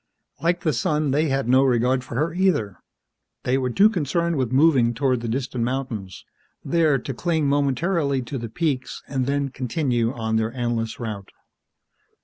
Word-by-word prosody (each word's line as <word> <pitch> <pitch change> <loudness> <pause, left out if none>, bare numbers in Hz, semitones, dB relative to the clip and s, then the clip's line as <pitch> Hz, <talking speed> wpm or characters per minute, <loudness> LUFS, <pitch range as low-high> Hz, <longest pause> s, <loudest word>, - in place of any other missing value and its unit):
Like 175 +1 +1
the 155 - +1
sun, 150 +4 0
they 150 +3 +2
had 135 -2 0
no 130 +2 +5
regard 125 0 +2
for 120 - -8
her, 155 +6 0
either. 170 - 0 0.6
They 125 - +1
were 130 -1 -1
too 195 - +5
concerned 170 -3 0
with 130 -4 -1
moving 130 -4 +4
toward 130 -1 +1
the 115 - -4
distant 125 0 -2
mountains, 120 -7 -4 0.4
there 160 -4 +3
to 135 +2 -5
cling 160 +2 0
momentarily 140 0 +1
to 130 +2 -5
the 115 -1 -5
peaks 140 -1 -2
and 130 -2 -2
then 140 0 0
continue 125 -3 -1
on 110 -3 -1
their 110 +1 -1
endless 120 -2 -2
route. 105 -5 -5
130 Hz, 165 wpm, -23 LUFS, 120-150 Hz, 0.6 s, no